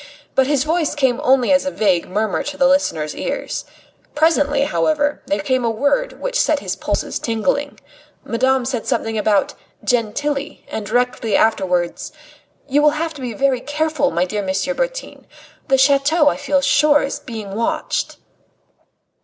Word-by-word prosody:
But 265 Hz, -1 st, +3 dB
his 285 Hz, -2 st, +2 dB
voice 315 Hz, -1 st, 0 dB
came 265 Hz, -2 st, +1 dB
only 265 Hz, -1 st, +4 dB
as 275 Hz, -, +3 dB
a 280 Hz, -, -1 dB
vague 190 Hz, -9 st, +1 dB
murmur 210 Hz, +2 st, -1 dB
to 290 Hz, 0 st, -5 dB
the 270 Hz, -, +3 dB
listener's 165 Hz, -, +1 dB
ears. -, -, -4 dB, 0.5 s
Presently, 290 Hz, -2 st, +3 dB
however, 290 Hz, -, 0 dB
there 295 Hz, -, 0 dB
came 260 Hz, -4 st, 0 dB
a 230 Hz, -, +1 dB
word 285 Hz, -, 0 dB
which -, -, -1 dB
set -, -, +3 dB
his -, -, -4 dB
pulses -, -, -2 dB
tingling. 270 Hz, +5 st, -1 dB, 0.4 s
Madame 260 Hz, +2 st, +1 dB
said 250 Hz, -3 st, -3 dB
something 225 Hz, 0 st, -1 dB
about 210 Hz, -2 st, +1 dB, 0.3 s
"Gentilly," 275 Hz, +5 st, -1 dB
and 215 Hz, -2 st, -4 dB
directly 245 Hz, -2 st, 0 dB
afterwards: 180 Hz, -5 st, 0 dB, 0.6 s
"You 290 Hz, +2 st, +2 dB
will 300 Hz, 0 st, +3 dB
have 325 Hz, +1 st, -2 dB
to 285 Hz, -, -11 dB
be 245 Hz, -3 st, -4 dB
very 265 Hz, +2 st, +1 dB
careful, 300 Hz, +1 st, 0 dB
my 170 Hz, +2 st, 0 dB
dear 205 Hz, +2 st, -3 dB
M. 190 Hz, 0 st, -2 dB, 0.2 s
Bertin. -, -, -4 dB, 0.4 s
The 270 Hz, -, +3 dB
chateau, 285 Hz, +3 st, +4 dB
I -, -, -2 dB
feel 280 Hz, 0 st, 0 dB
sure, 290 Hz, +1 st, +4 dB
is 275 Hz, -, -3 dB
being 215 Hz, -5 st, -7 dB
watched." 230 Hz, +3 st, -2 dB
270 Hz, 160 wpm, -19 LUFS, 225-290 Hz, 0.6 s, only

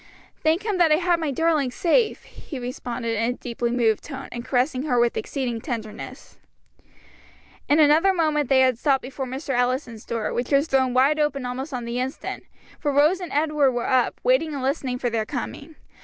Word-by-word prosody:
"Thank 320 Hz, +5 st, +2 dB
Him 410 Hz, -5 st, -1 dB
that 335 Hz, -3 st, +5 dB
I -, -, +7 dB
have 345 Hz, +1 st, +1 dB
my 320 Hz, -3 st, -1 dB
darling 305 Hz, -1 st, +1 dB
safe." 360 Hz, -, +1 dB
he 290 Hz, -, -10 dB
responded 245 Hz, -2 st, -4 dB
in 230 Hz, +3 st, 0 dB
a -, -, -21 dB
deeply 240 Hz, -1 st, -3 dB
moved 235 Hz, -3 st, +1 dB
tone, 275 Hz, -2 st, -8 dB
and 240 Hz, 0 st, -6 dB
caressing 255 Hz, +1 st, 0 dB
her 250 Hz, -4 st, +1 dB
with 240 Hz, 0 st, +2 dB
exceeding 245 Hz, -5 st, -3 dB
tenderness. 220 Hz, -5 st, -7 dB, 1.3 s
In 295 Hz, -, +4 dB
another 310 Hz, +5 st, +5 dB
moment 310 Hz, -6 st, 0 dB
they 265 Hz, -1 st, +5 dB
had 255 Hz, -3 st, +3 dB
stopped 275 Hz, -2 st, +2 dB
before 265 Hz, +1 st, -5 dB
Mr. 270 Hz, +2 st, -4 dB
Allison's 245 Hz, -2 st, -1 dB
door, 230 Hz, -2 st, -2 dB
which 245 Hz, +3 st, -3 dB
was 280 Hz, +1 st, +4 dB
thrown 260 Hz, -4 st, +1 dB
wide 280 Hz, +4 st, +4 dB
open 290 Hz, -3 st, 0 dB
almost 260 Hz, +4 st, -4 dB
on 245 Hz, -3 st, -4 dB
the 235 Hz, +1 st, -3 dB
instant; 260 Hz, +2 st, -4 dB, 0.3 s
for 290 Hz, -, 0 dB
Rose 300 Hz, +6 st, +4 dB
and 360 Hz, -3 st, -6 dB
Edward 295 Hz, -2 st, +2 dB
were 240 Hz, -1 st, -2 dB
up, 255 Hz, -2 st, +1 dB
waiting 285 Hz, +5 st, +2 dB
and 270 Hz, -, -4 dB
listening 265 Hz, -2 st, -1 dB
for 245 Hz, -1 st, -2 dB
their 225 Hz, -1 st, 0 dB
coming. 285 Hz, +3 st, -6 dB
265 Hz, 195 wpm, -24 LUFS, 245-300 Hz, 1.3 s, I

